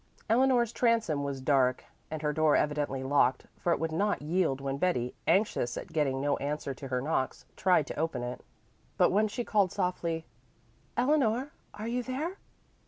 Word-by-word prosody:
Eleanor's 240 Hz, 0 st, +3 dB
transom 225 Hz, -, +1 dB
was 140 Hz, -1 st, -3 dB
dark 130 Hz, -2 st, +2 dB, 0.2 s
and 155 Hz, 0 st, -5 dB
her 150 Hz, 0 st, +1 dB
door 155 Hz, -1 st, +3 dB
evidently 145 Hz, -3 st, 0 dB
locked, 135 Hz, -1 st, +2 dB
for 175 Hz, -, -1 dB
it -, -, +3 dB
would 165 Hz, 0 st, -1 dB
not 205 Hz, +6 st, +1 dB
yield 160 Hz, -4 st, +1 dB
when 135 Hz, 0 st, -3 dB
Betty, 125 Hz, -9 st, 0 dB
anxious 195 Hz, -, +2 dB
at 165 Hz, -, -7 dB
getting 140 Hz, -4 st, +1 dB
no 145 Hz, +1 st, +1 dB
answer 145 Hz, 0 st, -3 dB
to 135 Hz, +1 st, -8 dB
her 125 Hz, -1 st, -1 dB
knocks, 140 Hz, -3 st, -1 dB
tried 180 Hz, -6 st, +3 dB
to -, -, -6 dB
open 155 Hz, -6 st, -1 dB
it. 125 Hz, +1 st, -5 dB, 0.6 s
But 180 Hz, -, +4 dB
when 210 Hz, +3 st, +3 dB
she 225 Hz, +4 st, -3 dB
called 205 Hz, -5 st, +2 dB
softly, 170 Hz, -4 st, -2 dB, 0.7 s
"Eleanor, 260 Hz, 0 st, +2 dB, 0.2 s
are 215 Hz, +2 st, -5 dB
you 245 Hz, +2 st, -1 dB
there? 285 Hz, +10 st, -3 dB
160 Hz, 170 wpm, -30 LUFS, 140-215 Hz, 0.7 s, But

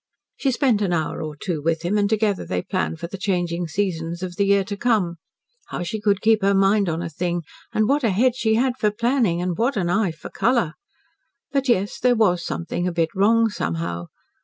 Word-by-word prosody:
She 275 Hz, -, 0 dB
spent 250 Hz, -4 st, +2 dB
an 190 Hz, -4 st, +1 dB
hour 160 Hz, -3 st, -1 dB
or 155 Hz, -1 st, -5 dB
two 160 Hz, 0 st, -3 dB
with 165 Hz, +1 st, 0 dB
him, 180 Hz, +4 st, 0 dB
and 205 Hz, -1 st, +2 dB
together 215 Hz, -3 st, +1 dB
they 90 Hz, -1 st, -3 dB
planned 80 Hz, 0 st, -2 dB
for -, -, -5 dB
the 190 Hz, +3 st, -7 dB
changing 175 Hz, -3 st, -1 dB
seasons 170 Hz, -1 st, -2 dB
of 180 Hz, -1 st, -5 dB
the 200 Hz, -, +1 dB
year 200 Hz, 0 st, +4 dB
to 200 Hz, +1 st, -5 dB
come. 200 Hz, -6 st, +1 dB, 0.5 s
How -, -, -4 dB
she 205 Hz, +5 st, -4 dB
could 200 Hz, -2 st, +2 dB
keep 220 Hz, -1 st, +4 dB
her 200 Hz, +1 st, +3 dB
mind 195 Hz, 0 st, +3 dB
on 165 Hz, +1 st, -2 dB
a -, -, -3 dB
thing, 175 Hz, +2 st, -2 dB, 0.3 s
and 215 Hz, 0 st, +1 dB
what 280 Hz, +2 st, +2 dB
a 230 Hz, -, +3 dB
head 235 Hz, +6 st, +2 dB
she 220 Hz, -3 st, +1 dB
had 250 Hz, +2 st, +1 dB
for 210 Hz, -, +3 dB
planning, 220 Hz, -5 st, +1 dB
and 180 Hz, -1 st, -1 dB
what 240 Hz, +6 st, 0 dB
an 175 Hz, -3 st, 0 dB
eye 200 Hz, -2 st, +2 dB
for 160 Hz, -, -10 dB
colour! 235 Hz, -10 st, +1 dB, 0.8 s
But 275 Hz, -2 st, 0 dB
yes 200 Hz, -3 st, +1 dB
there 250 Hz, -1 st, +3 dB
was 180 Hz, -6 st, +2 dB
something 175 Hz, +1 st, -3 dB
a -, -, 0 dB
bit 165 Hz, -1 st, 0 dB
wrong 225 Hz, +4 st, +3 dB
somehow. 85 Hz, -, -3 dB
195 Hz, 220 wpm, -22 LUFS, 170-220 Hz, 0.8 s, year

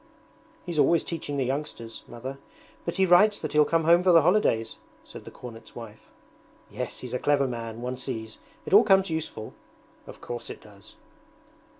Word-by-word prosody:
'He's 170 Hz, -4 st, -3 dB
always 170 Hz, +2 st, +4 dB
teaching 145 Hz, -4 st, -4 dB
the 135 Hz, -, 0 dB
youngsters. 130 Hz, -4 st, -4 dB
Mother. 130 Hz, +3 st, -7 dB, 0.5 s
But 170 Hz, -, -3 dB
he 190 Hz, -, +4 dB
writes 205 Hz, +4 st, +5 dB
that 155 Hz, -, -5 dB
he'll 150 Hz, 0 st, +5 dB
come 165 Hz, +1 st, +1 dB
home 170 Hz, +2 st, +5 dB
for 180 Hz, 0 st, +4 dB
the 165 Hz, -3 st, +6 dB
holidays,' 165 Hz, -, +2 dB, 0.3 s
said -, -, -12 dB
the -, -, -8 dB
cornet's 115 Hz, -2 st, -11 dB
wife. 110 Hz, -2 st, -11 dB, 0.6 s
'Yes, -, -, -5 dB
he's 125 Hz, -1 st, -7 dB
a 125 Hz, -, -1 dB
clever 145 Hz, -1 st, +2 dB
man, 115 Hz, -1 st, -6 dB
one 125 Hz, +1 st, -3 dB
sees; 115 Hz, -4 st, -6 dB, 0.3 s
it -, -, -4 dB
all 205 Hz, -, +9 dB
comes 195 Hz, -3 st, +4 dB
useful.' 160 Hz, -9 st, -5 dB, 0.5 s
'Of -, -, -11 dB
course 120 Hz, -1 st, -7 dB
it -, -, -8 dB
does.' 105 Hz, 0 st, -16 dB
140 Hz, 180 wpm, -26 LUFS, 115-170 Hz, 0.6 s, all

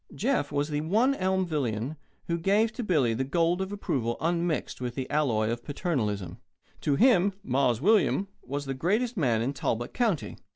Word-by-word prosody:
Jeff 235 Hz, -, 0 dB
was 145 Hz, +1 st, 0 dB
the 150 Hz, -1 st, -1 dB
one 220 Hz, -, +2 dB
Elmvillian 155 Hz, -, -1 dB, 0.3 s
who 170 Hz, 0 st, -1 dB
gave 205 Hz, +6 st, +2 dB
to 245 Hz, -, -4 dB
Billy 150 Hz, -, +2 dB
the 125 Hz, +4 st, -1 dB
gold 170 Hz, +6 st, +1 dB
of 190 Hz, +1 st, -3 dB
approval 125 Hz, -, -2 dB
unmixed 170 Hz, -3 st, -1 dB
with 125 Hz, -1 st, -3 dB
the 130 Hz, -1 st, -3 dB
alloy 115 Hz, -8 st, +1 dB
of 120 Hz, 0 st, -4 dB
paternalism. 105 Hz, -, -2 dB, 0.4 s
To 145 Hz, -3 st, +1 dB
him 200 Hz, -, +4 dB
"Mars 125 Hz, -3 st, +1 dB
William" 200 Hz, +1 st, +3 dB
was 145 Hz, +2 st, -4 dB
the 135 Hz, -, -2 dB
greatest 215 Hz, -, 0 dB
man 120 Hz, -, +1 dB
in 135 Hz, +4 st, -1 dB
Talbot 120 Hz, -3 st, -2 dB
County. 225 Hz, -, -1 dB
150 Hz, 170 wpm, -28 LUFS, 125-190 Hz, 0.4 s, him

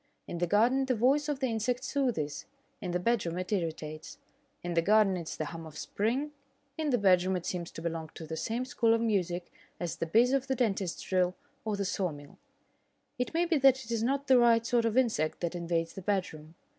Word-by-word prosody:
In 170 Hz, -, -5 dB
the 175 Hz, -, +1 dB
garden 240 Hz, +8 st, +3 dB
the 255 Hz, -, +2 dB
voice 275 Hz, +6 st, +2 dB
of 285 Hz, -2 st, -2 dB
the -, -, +2 dB
insect 245 Hz, +2 st, -1 dB
soothes; 245 Hz, -, -1 dB, 0.3 s
in 185 Hz, -, -4 dB
the 175 Hz, 0 st, 0 dB
bedroom 180 Hz, -4 st, 0 dB
it 185 Hz, +2 st, -4 dB
irritates. 160 Hz, -5 st, -3 dB, 0.5 s
In 175 Hz, 0 st, -3 dB
the 165 Hz, -, +3 dB
garden 205 Hz, +1 st, +4 dB
it 170 Hz, -3 st, -5 dB
is -, -, -6 dB
the 155 Hz, -, -2 dB
hum 165 Hz, +1 st, -7 dB
of 155 Hz, -1 st, -11 dB
spring; 255 Hz, +8 st, -1 dB, 0.4 s
in 310 Hz, -1 st, -1 dB
the 250 Hz, -, +3 dB
bedroom 185 Hz, -2 st, +3 dB
it 180 Hz, -, -4 dB
seems 175 Hz, -2 st, -3 dB
to 165 Hz, -, -9 dB
belong 165 Hz, -2 st, -3 dB
to 160 Hz, -, -7 dB
the 160 Hz, +1 st, -5 dB
same 230 Hz, +9 st, -2 dB
school 230 Hz, -3 st, +2 dB
of 230 Hz, -, -1 dB
music 180 Hz, -6 st, -1 dB, 0.3 s
as 175 Hz, -2 st, -3 dB
the 165 Hz, -, -2 dB
bizz 235 Hz, +9 st, +4 dB
of 270 Hz, -1 st, +1 dB
the 265 Hz, -, 0 dB
dentist's 200 Hz, -7 st, -1 dB
drill 185 Hz, -1 st, +1 dB, 0.3 s
or 215 Hz, -1 st, 0 dB
the 200 Hz, -, -1 dB
saw 185 Hz, -2 st, -1 dB
mill. 145 Hz, -1 st, -12 dB, 0.8 s
It 250 Hz, +6 st, -2 dB
may 345 Hz, +1 st, +3 dB
be 335 Hz, -3 st, +2 dB
that 265 Hz, -1 st, +4 dB
it 230 Hz, -, -8 dB
is 230 Hz, -1 st, 0 dB
not 275 Hz, +4 st, 0 dB
the 260 Hz, -3 st, +6 dB
right 230 Hz, -1 st, +4 dB
sort 235 Hz, -1 st, +2 dB
of 230 Hz, +1 st, 0 dB
insect 220 Hz, -12 st, +1 dB
that 170 Hz, 0 st, -1 dB
invades 170 Hz, -1 st, -2 dB
the 190 Hz, -, -7 dB
bedroom. 175 Hz, -5 st, -3 dB
205 Hz, 225 wpm, -30 LUFS, 170-245 Hz, 0.8 s, the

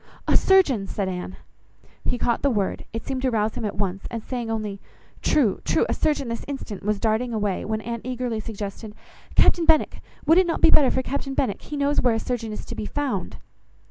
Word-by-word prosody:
"A -, -, +4 dB
surgeon!" 285 Hz, -, +4 dB
said 195 Hz, -1 st, -2 dB
Anne. 185 Hz, 0 st, -4 dB, 0.7 s
He 245 Hz, -, 0 dB
caught 235 Hz, -1 st, 0 dB
the 280 Hz, -, +3 dB
word; 205 Hz, -6 st, -1 dB
it 225 Hz, 0 st, -5 dB
seemed 265 Hz, -1 st, -2 dB
to 260 Hz, -, +2 dB
rouse 220 Hz, -2 st, +1 dB
him -, -, -4 dB
at 210 Hz, -, -3 dB
once, 195 Hz, -1 st, -2 dB
and 230 Hz, -2 st, -5 dB
saying 245 Hz, -3 st, -4 dB
only—"True, 215 Hz, +3 st, -1 dB
true, -, -, +2 dB
a -, -, +2 dB
surgeon 295 Hz, -4 st, 0 dB
this 230 Hz, 0 st, -4 dB
instant," 270 Hz, -8 st, -5 dB
was 210 Hz, 0 st, 0 dB
darting 225 Hz, +2 st, 0 dB
away, 205 Hz, -3 st, -1 dB
when 220 Hz, 0 st, -2 dB
Anne 235 Hz, 0 st, -4 dB
eagerly 250 Hz, -3 st, -2 dB
suggested— 210 Hz, 0 st, -6 dB, 0.4 s
"Captain 340 Hz, -2 st, +5 dB
Benwick, 320 Hz, -2 st, +3 dB, 0.2 s
would 330 Hz, +5 st, +6 dB
not 330 Hz, -, 0 dB
it -, -, -10 dB
be 325 Hz, -, +8 dB
better 275 Hz, -4 st, +6 dB
for 260 Hz, -, 0 dB
Captain 275 Hz, 0 st, -3 dB
Benwick? 210 Hz, -7 st, 0 dB
He 295 Hz, -, -6 dB
knows 285 Hz, +1 st, +2 dB
where 245 Hz, -3 st, +3 dB
a -, -, 0 dB
surgeon 235 Hz, -3 st, -3 dB
is 210 Hz, -, -6 dB
to -, -, -7 dB
be 210 Hz, -, -4 dB
found." 290 Hz, -2 st, -2 dB
230 Hz, 210 wpm, -24 LUFS, 210-270 Hz, 0.7 s, be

